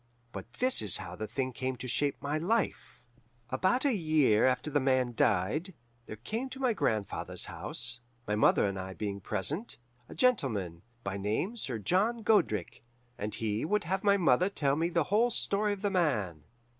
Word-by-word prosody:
"But -, -, -9 dB
this 255 Hz, +1 st, +4 dB
is 105 Hz, -5 st, +4 dB
how 90 Hz, -, -7 dB
the 110 Hz, +3 st, -5 dB
thing 130 Hz, +1 st, -2 dB
came 130 Hz, +2 st, -3 dB
to 125 Hz, +1 st, -7 dB
shape 140 Hz, +3 st, 0 dB
my 145 Hz, +2 st, -1 dB
life: 215 Hz, +7 st, -2 dB, 0.5 s
"About 185 Hz, -, +1 dB
a 275 Hz, -, +3 dB
year 155 Hz, -, +3 dB
after 130 Hz, +4 st, -1 dB
The 145 Hz, -, +2 dB
Man 130 Hz, -2 st, +1 dB
died, 115 Hz, -, +1 dB, 0.3 s
there -, -, -6 dB
came 225 Hz, -, -4 dB
to 265 Hz, -, -9 dB
my 255 Hz, -3 st, +2 dB
grandfather's 110 Hz, -, -1 dB
house, 120 Hz, 0 st, -1 dB, 0.3 s
my 105 Hz, -, -1 dB
mother 105 Hz, 0 st, +4 dB
and 100 Hz, -1 st, -2 dB
I 95 Hz, 0 st, -6 dB
being 100 Hz, -2 st, -4 dB
present, 155 Hz, -, -1 dB, 0.3 s
a -, -, -10 dB
gentleman, 115 Hz, -, +1 dB, 0.2 s
by 100 Hz, 0 st, -3 dB
name 110 Hz, -, -2 dB
Sir 130 Hz, -, -4 dB
John 210 Hz, -, +1 dB
Godric, 110 Hz, -, +1 dB, 0.4 s
and 105 Hz, +1 st, -4 dB
he 110 Hz, -1 st, -2 dB
would 210 Hz, +6 st, 0 dB
have 190 Hz, +3 st, -2 dB
my 200 Hz, -1 st, +4 dB
mother 180 Hz, 0 st, +3 dB
tell 140 Hz, -8 st, 0 dB
the 170 Hz, +1 st, +1 dB
whole 215 Hz, +8 st, +2 dB
story 210 Hz, -2 st, +1 dB
of 205 Hz, 0 st, -5 dB
The 205 Hz, -, +1 dB
Man. 105 Hz, -, 0 dB
140 Hz, 180 wpm, -30 LUFS, -, 0.5 s, this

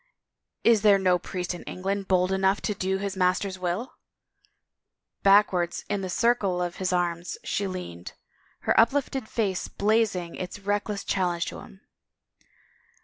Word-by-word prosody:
Is 230 Hz, -3 st, +5 dB
there 205 Hz, -2 st, +6 dB
no 185 Hz, -2 st, +2 dB
priest 180 Hz, -1 st, -4 dB
in 175 Hz, -, -8 dB
England 195 Hz, +1 st, -3 dB
bold 185 Hz, 0 st, +2 dB
enough 190 Hz, +1 st, +2 dB
to 210 Hz, -, -1 dB
do 190 Hz, 0 st, -1 dB
his 200 Hz, 0 st, -3 dB
master's 185 Hz, +1 st, 0 dB
will? 185 Hz, +8 st, -3 dB, 0.6 s
" -, -, -60 dB
Backwards 195 Hz, -4 st, +3 dB
in 205 Hz, -1 st, -1 dB
the 185 Hz, -, -4 dB
circle 200 Hz, -3 st, +1 dB
of 175 Hz, -1 st, -3 dB
his 185 Hz, -1 st, -1 dB
arms 175 Hz, -1 st, -1 dB
she 200 Hz, -, -1 dB
leaned, 90 Hz, -, -7 dB, 0.5 s
her -, -, +2 dB
uplifted 265 Hz, 0 st, +1 dB
face 200 Hz, -6 st, -1 dB
blazing 205 Hz, -5 st, 0 dB
its 185 Hz, +1 st, -6 dB
reckless 205 Hz, 0 st, -1 dB
challenge 175 Hz, -3 st, -1 dB
into -, -, -9 dB
his. 190 Hz, -, -15 dB
190 Hz, 145 wpm, -26 LUFS, 180-205 Hz, 0.6 s, there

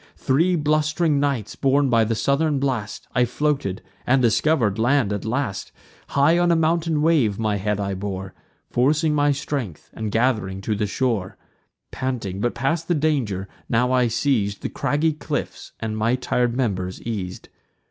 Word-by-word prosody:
Three 165 Hz, +7 st, +2 dB
blust'ring 155 Hz, 0 st, +1 dB
nights, 140 Hz, -7 st, -1 dB
borne 140 Hz, +1 st, +2 dB
by 115 Hz, -1 st, +4 dB
the 115 Hz, +1 st, -1 dB
southern 140 Hz, +6 st, +1 dB
blast, 130 Hz, -6 st, -2 dB
I 125 Hz, -, +3 dB
floated, 125 Hz, -6 st, -1 dB, 0.2 s
and 130 Hz, +2 st, +4 dB
discover'd 115 Hz, -2 st, +2 dB
land 120 Hz, -2 st, +2 dB
at 100 Hz, -, -4 dB
last: 110 Hz, -5 st, -2 dB, 0.4 s
High 150 Hz, +5 st, +3 dB
on 175 Hz, 0 st, +3 dB
a -, -, +4 dB
mounting 165 Hz, -1 st, +1 dB
wave 140 Hz, -11 st, +3 dB
my 110 Hz, -2 st, 0 dB
head 105 Hz, +1 st, -1 dB
I 100 Hz, -1 st, -2 dB
bore, 95 Hz, -1 st, -5 dB, 0.4 s
Forcing 150 Hz, +5 st, +2 dB
my 145 Hz, 0 st, +3 dB
strength, 135 Hz, -, -4 dB
and 110 Hz, -1 st, -4 dB
gath'ring 110 Hz, -5 st, 0 dB
to 105 Hz, +2 st, -1 dB
the 105 Hz, 0 st, -1 dB
shore. 110 Hz, -4 st, -1 dB, 0.5 s
Panting, 110 Hz, -7 st, -3 dB
but 120 Hz, -, 0 dB
past 165 Hz, +4 st, -1 dB
the 175 Hz, -, +2 dB
danger, 130 Hz, -11 st, 0 dB, 0.2 s
now 125 Hz, +2 st, +2 dB
I 125 Hz, -1 st, +3 dB
seiz'd 110 Hz, -4 st, 0 dB
The -, -, -2 dB
craggy 155 Hz, +2 st, 0 dB
cliffs, 150 Hz, -, -5 dB
and 110 Hz, -1 st, -3 dB
my 110 Hz, +3 st, +1 dB
tir'd 125 Hz, -1 st, 0 dB
members 95 Hz, -7 st, -1 dB
eas'd. 95 Hz, -6 st, -5 dB
125 Hz, 160 wpm, -23 LUFS, 105-145 Hz, 0.5 s, by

